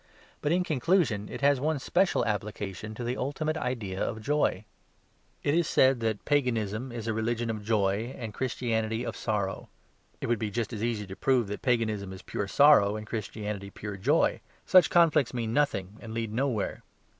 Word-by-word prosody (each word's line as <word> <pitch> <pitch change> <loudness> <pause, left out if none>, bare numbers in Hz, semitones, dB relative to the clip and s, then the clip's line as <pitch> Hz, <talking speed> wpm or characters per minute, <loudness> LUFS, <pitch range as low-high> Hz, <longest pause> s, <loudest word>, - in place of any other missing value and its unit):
But, 150 - 0
in 180 +1 +3
conclusion, 145 - +1
it - - -7
has 140 -1 +4
one 155 +3 0
special 175 +7 +1
application 105 0 -4
to 120 - -5
the 120 +2 -2
ultimate 150 +4 -2
idea 115 -9 -3
of 110 - -3
joy. 125 -5 0 0.8
It 145 - +2
is 170 0 +2
said 130 -1 +4
that 110 -2 -2
Paganism 125 -4 0
is 115 -2 -6
a 110 - 0
religion 115 +1 -1
of 105 -2 -5
joy 105 +3 0
and 115 -3 -6
Christianity 115 -2 -1
of 115 -3 -4
sorrow; 100 -5 -2 0.5
it - - -4
would 120 -2 +1
be 110 - -2
just 115 +2 -3
as 110 0 -4
easy 115 -3 -1
to 95 0 -8
prove 125 +2 +2
that 105 - -5
Paganism 110 -6 0
is 95 - -10
pure 100 - -3
sorrow 110 -4 +6
and 110 0 -6
Christianity 105 -2 -5
pure 105 +1 -7
joy. 95 - +2 0.2
Such 185 -1 +6
conflicts 155 -7 +4
mean 115 -2 -2
nothing 105 -9 0
and 110 -1 -7
lead 115 -2 -3
nowhere. 125 -3 -1
115 Hz, 180 wpm, -28 LUFS, 105-130 Hz, 0.8 s, sorrow